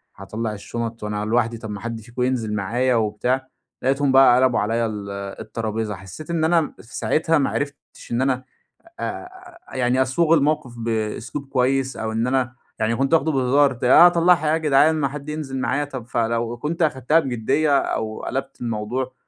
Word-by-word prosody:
هاطلع 110 Hz, +3 st, -4 dB
الشنط 115 Hz, +2 st, -5 dB
وأنا 105 Hz, 0 st, -2 dB
لوحدي؟ 115 Hz, +1 st, +1 dB
طب، 110 Hz, -1 st, -8 dB
ما 100 Hz, -, -5 dB
حد 115 Hz, -1 st, -5 dB
فيكم 120 Hz, +3 st, -7 dB
ينزل 120 Hz, -4 st, -1 dB
معايا 120 Hz, +6 st, +1 dB
وبتاع." 125 Hz, +4 st, 0 dB, 0.3 s
لقيتهم 135 Hz, +1 st, +2 dB
بقى 130 Hz, -2 st, +7 dB
قلبوا 130 Hz, -2 st, +3 dB
عليَّ 115 Hz, +3 st, 0 dB
ال 105 Hz, -2 st, -6 dB, 0.3 s
الترابيزة، 110 Hz, -1 st, -3 dB
حسّيت 95 Hz, -, -10 dB
إن 165 Hz, -2 st, 0 dB
أنا 165 Hz, -1 st, +2 dB
في 115 Hz, -, -13 dB
ساعتها 160 Hz, +1 st, +2 dB
ما 140 Hz, -, +1 dB
عرفتش 140 Hz, -3 st, -6 dB
إن 120 Hz, -, +1 dB
أنا 130 Hz, -1 st, 0 dB, 0.6 s
آآ، 365 Hz, -1 st, -7 dB, 0.2 s
يعني 125 Hz, 0 st, +1 dB
أصوغ 155 Hz, +5 st, +2 dB
الموقف 145 Hz, -4 st, 0 dB
بأسلوب 115 Hz, +4 st, -3 dB
كويّس، 130 Hz, 0 st, +1 dB
أو 110 Hz, 0 st, -3 dB
إن 115 Hz, +2 st, 0 dB
أنا 125 Hz, -1 st, 0 dB, 0.2 s
يعني 110 Hz, +2 st, +1 dB
كنت 135 Hz, +4 st, 0 dB
واخده 160 Hz, 0 st, +2 dB
بهزار، 135 Hz, +1 st, +3 dB
ت 120 Hz, -, -11 dB
أطلعها 170 Hz, +2 st, +6 dB
إيه 155 Hz, -, +3 dB
يا -, -, +3 dB
جدعان 155 Hz, 0 st, +4 dB
ما 150 Hz, -3 st, +1 dB
حد 145 Hz, +2 st, -7 dB
ينزل 150 Hz, -3 st, -4 dB
معايا 140 Hz, +4 st, 0 dB
طب، 130 Hz, -5 st, -7 dB
فلو 115 Hz, 0 st, -1 dB
كنت 160 Hz, +7 st, -3 dB
أخدتها 150 Hz, 0 st, +3 dB
بجدية 140 Hz, +2 st, +1 dB
أو 110 Hz, 0 st, -3 dB
قلبت 135 Hz, -1 st, -4 dB
الموضوع، 120 Hz, +3 st, -3 dB
130 Hz, 175 wpm, -22 LUFS, 115-145 Hz, 0.6 s, بقى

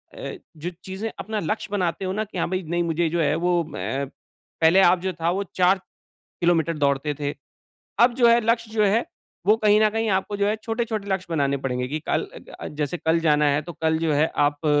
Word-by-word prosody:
अ, -, -, -6 dB, 0.2 s
जो 170 Hz, +4 st, -4 dB
चीज़ें 195 Hz, +4 st, -4 dB
अपना 215 Hz, 0 st, -3 dB
लक्ष्य 215 Hz, 0 st, -3 dB
बनाते 185 Hz, -2 st, -1 dB
हो 185 Hz, -, -1 dB
ना 215 Hz, +2 st, -1 dB
कि 200 Hz, -3 st, -9 dB
हाँ, 165 Hz, -, 0 dB
भाई 185 Hz, 0 st, -2 dB
नहीं 175 Hz, 0 st, +1 dB
मुझे 165 Hz, 0 st, 0 dB
जो 170 Hz, 0 st, 0 dB
है 150 Hz, 0 st, +2 dB
वो 175 Hz, +1 st, +1 dB
अ, 140 Hz, -3 st, -3 dB, 0.6 s
पहले 165 Hz, +4 st, +6 dB
आप 180 Hz, 0 st, +5 dB
जो 190 Hz, 0 st, -1 dB
था 165 Hz, 0 st, -1 dB
वो 195 Hz, +2 st, -1 dB
4 185 Hz, +1 st, +4 dB, 0.6 s
किलोमीटर 165 Hz, -2 st, +2 dB
दौड़ते 140 Hz, +1 st, +1 dB
थे। 145 Hz, 0 st, -2 dB, 0.7 s
अब 240 Hz, +1 st, +6 dB
जो 240 Hz, -1 st, +5 dB
है, 235 Hz, 0 st, +5 dB
लक्ष्य 230 Hz, 0 st, 0 dB
जो 215 Hz, -1 st, +2 dB
है, 215 Hz, +4 st, +2 dB, 0.4 s
वो 215 Hz, +2 st, +6 dB
कहीं 210 Hz, -1 st, +4 dB
न 215 Hz, -, +5 dB
कहीं 225 Hz, +1 st, -1 dB
आपको 200 Hz, +2 st, -3 dB
जो 200 Hz, 0 st, +1 dB
है 210 Hz, -, +1 dB
छोटे-छोटे 225 Hz, -3 st, -2 dB
लक्ष्य 190 Hz, -1 st, -1 dB
बनाने 140 Hz, -4 st, +1 dB
पड़ेंगे 125 Hz, -1 st, -1 dB
कि 155 Hz, +4 st, -2 dB
कल -, -, +1 dB
अ -, -, -8 dB, 0.2 s
अ, -, -, -5 dB
जैसे 150 Hz, +3 st, -3 dB
कल 160 Hz, +1 st, +2 dB
जाना 150 Hz, -2 st, +3 dB
है, 145 Hz, +2 st, +1 dB
तो 175 Hz, -, -8 dB
कल 160 Hz, 0 st, +2 dB
जो 160 Hz, -2 st, 0 dB
है 150 Hz, +2 st, +3 dB
आप 145 Hz, +1 st, +1 dB
175 Hz, 225 wpm, -24 LUFS, 155-210 Hz, 0.7 s, पहले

